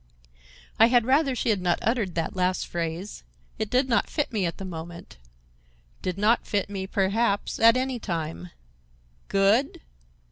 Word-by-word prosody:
I 225 - +8
had 240 -1 +3
rather 270 +1 +2
she 240 - -1
had 205 -4 +1
not 175 -1 +1
uttered 220 -6 0
that 165 +2 -2
last 185 0 0
phrase. 170 +3 -5 0.4
It 220 -1 -2
did 255 +3 +2
not 235 - +1
fit 295 -5 -2
me 200 -5 0
at 170 - -5
the 195 - -7
moment,—did - - -10
not 215 +4 +2
fit 205 -1 -1
me, 190 -1 -4
perhaps, 200 +2 0
at 230 +2 +6
any 260 -1 -2
time. 170 -3 -4 0.8
Good! 200 +7 +2
195 Hz, 150 wpm, -26 LUFS, 170-230 Hz, 0.8 s, I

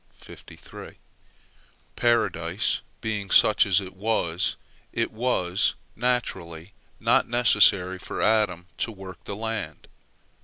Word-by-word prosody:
Paradise 95 -7 0 0.2
being 105 -3 -3
such 105 +2 +5
as 95 -1 +4
it 95 -2 -8
was, 95 -5 -1 0.4
it - - -1
was, 110 -5 0 0.2
naturally, 95 -8 -2 0.3
not - - +2
necessary 105 -6 +4
for - - -6
Adam 105 -6 +1
to 115 - -1
work 95 -4 -11
the 100 - -4
land. 105 -8 -5
100 Hz, 100 wpm, -25 LUFS, 90-110 Hz, 0.4 s, such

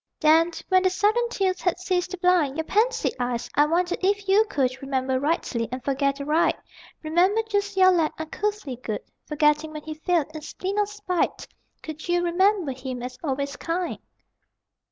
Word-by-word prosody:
Then, 325 0 +5 0.2
when 370 -1 +5
the 370 - +3
sudden 425 +6 +1
tears 375 -5 -1
had 360 -2 +1
ceased 365 0 -1
to 370 - -5
blind 350 -6 +2
Your 320 - 0
pansied 440 +9 +1
eyes, 245 -1 -2
I 295 +1 +4
wonder 350 +3 +1
if 400 +1 0
you 405 +3 +5
could 260 -4 -1
Remember 265 -1 -1
rightly, 275 -6 -1
and 255 0 -5
forget 275 0 0
aright? 300 +4 +2 0.5
Remember 360 +8 +2
just 405 -2 -1
your 375 0 +7
lad, 330 -4 +2
uncouthly 320 - -3
good, 225 -4 -4 0.3
Forgetting 300 +1 +1
when 305 -1 -7
he 315 - -5
failed 315 0 0
in 310 - -7
spleen 375 +6 -4
or 415 - +2
spite? 410 -4 -2 0.4
Could 315 +2 -8
you 350 0 +2
remember 365 -2 +2
him 255 -1 -6
as 250 +1 -7
always 280 -1 -2
kind? 345 +2 -3
330 Hz, 175 wpm, -25 LUFS, 280-375 Hz, 0.5 s, your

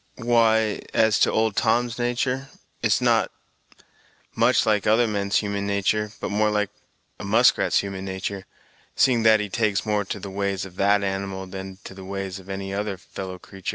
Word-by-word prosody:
"Why, 115 -3 +2
as 110 -2 +4
to - - +4
old 110 -2 +1
Tom's 120 +1 +1
human 120 0 0
natur', 130 +2 -2 0.3
it - - +2
is - - +2
not - - +3 1.0
much - - +3
like 105 -2 +1
other 110 +3 +4
men's 100 -2 0
human 100 -1 -3
natur', 100 +1 0
but - - -4
more 105 +1 +2
like 105 -1 0 0.5
a - - -7
muskrat's - - +3
human 95 -1 -6
natar', 95 +1 -4 0.5
seeing 125 -3 +3
that 110 -1 +5
he 105 - -2
takes 105 0 0
more 105 -1 +1
to - - -5
the 100 - -7
ways 100 -1 -2
of 90 -2 -12
that 100 +1 +3
animal 95 -1 -3
than 95 0 -8
to - - -9
the 95 0 -10
ways 95 0 -5
of 95 +1 -15
any 95 0 -4
other 100 -1 -3
fellow 95 0 -8
creatur'. 95 0 -8
100 Hz, 190 wpm, -24 LUFS, 95-110 Hz, 1.0 s, that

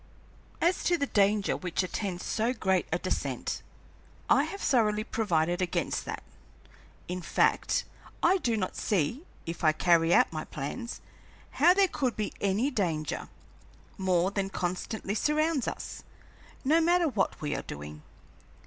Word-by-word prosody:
"As 345 +2 +2
to 350 - +3
the 285 - 0
danger 205 -4 +2
which 180 0 -1
attends 185 -1 -3
so 225 +3 0
great 190 -6 +1
a 170 - +2
descent, 185 +1 -2 0.7
I - - +5
have 395 - -6
thoroughly 215 -4 +2
provided 175 -6 0
against 180 - -1
that. - - -5 0.8
In 180 +1 -3
fact, - - +2 0.4
I 375 +3 +5
do 235 -8 0
not 185 -3 -2
see, 210 - -1 0.2
if 165 +1 -6
I 155 -1 +5
carry 165 0 +3
out 250 -1 +5
my 155 -1 -3
plans, 235 - -5 0.5
how 345 +6 +5
there 395 -1 +5
could 260 - -1
be 210 -1 -3
any 205 +8 +1
danger, 165 - -2 0.7
more 185 -1 +1
than 195 -1 -1
constantly 190 +3 -3
surrounds 300 +2 +1
us, - - -5 0.6
no 320 +5 +4
matter 345 +1 +3
what 225 -9 0
we 150 -1 -2
are - - -2
doing. 75 +1 -8
200 Hz, 145 wpm, -29 LUFS, 175-260 Hz, 0.8 s, I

